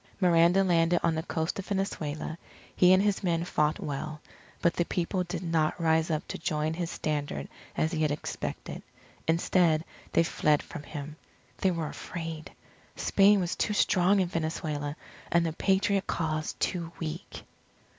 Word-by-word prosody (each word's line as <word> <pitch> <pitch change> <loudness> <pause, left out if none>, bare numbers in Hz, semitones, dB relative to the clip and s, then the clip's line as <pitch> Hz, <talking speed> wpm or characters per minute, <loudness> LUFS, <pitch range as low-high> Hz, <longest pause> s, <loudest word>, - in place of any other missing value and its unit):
Miranda 175 +1 +5
landed 170 -1 +3
on 165 - +3
the 160 - -1
coast 160 +1 -2
of 195 - -6
Venezuela. 160 -6 -2 0.4
He 180 0 +6
and 185 +1 +6
his 205 -1 +1
men 170 -2 +1
fought 150 -3 +1
well. 150 +2 -4 0.4
But 170 -2 +3
the 175 - +1
people 180 +2 -1
did 175 0 -5
not 165 -2 +1
rise 160 0 +2
up 155 -2 -1
to - - -4
join 155 -1 -1
his 170 0 -3
standard 145 - -2 0.3
as 160 - +1
he 160 -3 -1
had 155 - +3
expected. 145 - -4 0.5
Instead 165 -1 +3 0.3
they 165 - +5
fled 150 -2 +2
from 165 - -8
him. 150 +1 -7 0.4
They 190 - +3
were 165 -3 -1
afraid. 165 -2 -6 0.4
Spain 200 +1 +4
was 175 -1 -1
too 210 - 0
strong 190 0 +4
in 185 - +2
Venezuela, 155 -3 -2 0.4
and 170 0 +4
the 160 - -1
Patriot 195 +2 +1
cause 155 -1 -1
too 170 -2 -2
weak. 160 +2 -6
165 Hz, 160 wpm, -29 LUFS, 155-180 Hz, 0.5 s, He